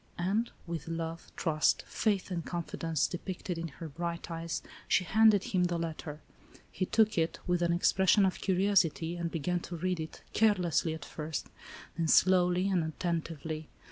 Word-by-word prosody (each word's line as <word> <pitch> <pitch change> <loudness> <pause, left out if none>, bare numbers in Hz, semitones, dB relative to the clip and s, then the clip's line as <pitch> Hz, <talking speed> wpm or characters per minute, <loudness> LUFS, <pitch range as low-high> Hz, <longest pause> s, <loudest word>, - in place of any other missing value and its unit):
And, 200 +7 0 0.2
with 165 -3 -5
love, 165 0 -5
trust, 155 -2 +2
faith 200 -3 0
and 170 -2 -2
confi 170 0 -5
dence 165 -3 +1
depicted 180 -1 -4
in 165 - -3
her 165 +2 -8
bright 170 +3 -4
eyes, 165 0 -3 0.2
she 185 - +3
handed 215 +2 +5
him 180 -2 +1
the 175 -1 0
letter. 160 -2 -5 0.5
He 185 - -2
took 220 -4 +3
it, 160 0 0
with 180 -1 +1
an 170 0 +2
expression 190 +3 +4
of 190 - -1
curiosity, 180 -4 +2
and 170 -1 -2
began 175 +2 -1
to 170 0 -7
read 180 +1 -1
it, 160 0 -7
carelessly 180 -7 +2
at 150 -2 -9
first, 155 -1 -5 0.5
then 165 - +1
slowly 180 +2 +4
and 185 -4 +2
attentively. 160 -1 -3
170 Hz, 165 wpm, -31 LUFS, 165-185 Hz, 0.5 s, handed